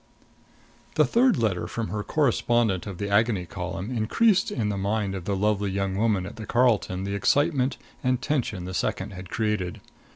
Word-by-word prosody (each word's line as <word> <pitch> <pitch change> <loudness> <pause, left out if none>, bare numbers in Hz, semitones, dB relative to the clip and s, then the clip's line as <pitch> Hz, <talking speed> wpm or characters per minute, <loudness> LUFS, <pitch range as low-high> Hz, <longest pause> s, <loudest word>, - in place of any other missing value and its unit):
The - - +5
third 250 +2 +3
letter 95 -7 0
from 115 +4 -4
her 105 - -2
correspondent 120 - +1
of 95 -3 -6
the 100 - -3
Agony 100 -2 +2
Column 95 +6 -5
increased 190 - +3
in 110 -5 -1
the 105 - -1
mind 100 0 -1
of 95 -3 -5
the 100 - 0
lovely 105 0 +1
young 95 0 -1
woman 105 -3 +1
at - - -9
the 110 - -7
Carlton 110 -6 +2
the 100 0 -3
excitement 135 - +2 0.3
and 125 -1 +2
tension 125 -10 -2
the 95 - -5
second 95 +2 -2
had 90 -1 -9
created. 105 -5 -1
105 Hz, 175 wpm, -26 LUFS, 95-120 Hz, 0.3 s, The